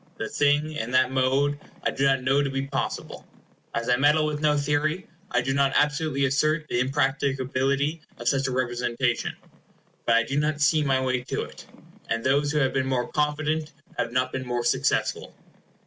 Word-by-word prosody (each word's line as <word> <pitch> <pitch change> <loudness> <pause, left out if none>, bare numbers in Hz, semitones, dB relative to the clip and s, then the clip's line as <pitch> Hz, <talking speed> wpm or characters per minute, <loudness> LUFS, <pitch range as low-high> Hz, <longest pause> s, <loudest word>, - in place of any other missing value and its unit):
The - - -3
thing, 145 +2 +2
in 120 -7 -4
that 130 0 +4
mode, 135 +2 +1 0.2
I - - +1
do 135 - 0
not 135 -2 +2
know 135 +2 +3
to 140 - 0
be 135 0 -2
possible. 135 -1 -4 0.5
As 115 0 -2
I 125 - +3
meddle 150 +3 +4
with 150 -1 -2
no 150 -1 +3
theory, 150 +5 0 0.2
I 125 - +1
do 135 +2 -1
not 140 -1 +2
absolutely 150 -1 +1
assert 155 +3 +1
the 120 - -1
impracticability 135 +2 0 0.2
of 120 - -6
such 135 +1 +2
a - - -2
representation; 120 -1 -1 0.7
but 115 - +5
I 115 - +4
do 135 +5 -1
not 150 0 0
see 155 +1 +3
my 135 -2 +2
way 130 -1 0
to - - -2
it, - - -12 0.4
and 115 0 -1
those 145 +2 +2
who 150 - -1
have 135 -3 +2
been 130 -1 0
more 125 -2 -1
confident 150 +1 -1 0.2
have 115 - -2
not 125 +1 0
been 130 - -3
more 120 -1 -1
successful. - - 0
135 Hz, 190 wpm, -25 LUFS, 130-150 Hz, 0.7 s, but